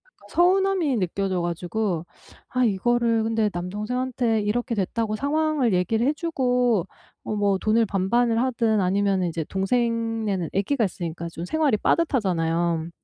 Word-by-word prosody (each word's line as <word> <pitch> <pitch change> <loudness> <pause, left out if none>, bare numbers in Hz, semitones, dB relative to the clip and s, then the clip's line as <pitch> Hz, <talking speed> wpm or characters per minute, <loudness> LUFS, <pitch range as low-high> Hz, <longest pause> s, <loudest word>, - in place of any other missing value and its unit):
그니까 - - -24
서운함이 365 -5 +2
느껴져 185 0 -1
가지고 175 +1 -2 0.4
아 255 0 +1
이거를 230 +2 +2
근데 220 -1 +1
남동생한테 225 +6 -1
이렇게 230 +3 -1
됐다고 215 +2 -1
상황을 290 -1 +1
얘기를 220 +7 +1
해주고 250 - +1 0.4
뭐 215 - -3
뭐 200 -1 +2
돈을 220 +2 +2
반반을 225 +5 +1
하든 230 -5 +1
아니면은 190 -1 +1
이제 165 0 -3
동생네는 225 -1 -1
아기가 220 +5 +1
있으니까 170 -2 -4
좀 165 - -7
생활이 300 -5 +2
빠듯하잖아요. 170 - 0
220 Hz, 345 characters per minute, -24 LUFS, 190-250 Hz, 0.4 s, 서운함이